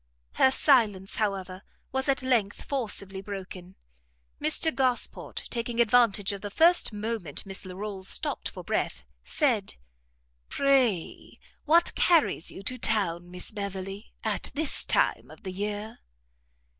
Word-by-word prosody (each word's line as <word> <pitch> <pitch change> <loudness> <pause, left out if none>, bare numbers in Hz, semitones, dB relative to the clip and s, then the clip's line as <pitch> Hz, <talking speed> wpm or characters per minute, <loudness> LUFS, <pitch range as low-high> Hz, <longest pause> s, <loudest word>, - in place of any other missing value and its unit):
Her 265 - +4
silence, 220 -9 +3
however, 195 -3 -2 0.3
was 265 +1 -1
at 270 -1 +1
length 235 -6 +1
forcibly 205 -7 -2
broken; 190 -2 -8 0.7
Mr 310 +1 +3
Gosport, 255 -2 -1
taking 235 0 -2
advantage 230 -4 +4
of 200 - -7
the 205 - -5
first 335 - +4
moment 210 -7 -4
Miss 195 0 -3
Larolles 190 0 -4
stopt - - -2
for - - -9
breath, - - -2 0.2
said, 240 -10 0 0.7
"Pray 260 -11 +1 0.3
what 335 +2 +4
carries 325 - +3
you 195 - -6
to 255 +4 -3
town, 175 -6 0
Miss 180 0 -3
Beverley, 195 0 -6
at - - -1
this 305 0 +2
time - - +1
of - - -15
the 190 - -5
year?" 210 +2 -4
210 Hz, 130 wpm, -27 LUFS, 195-255 Hz, 0.7 s, Her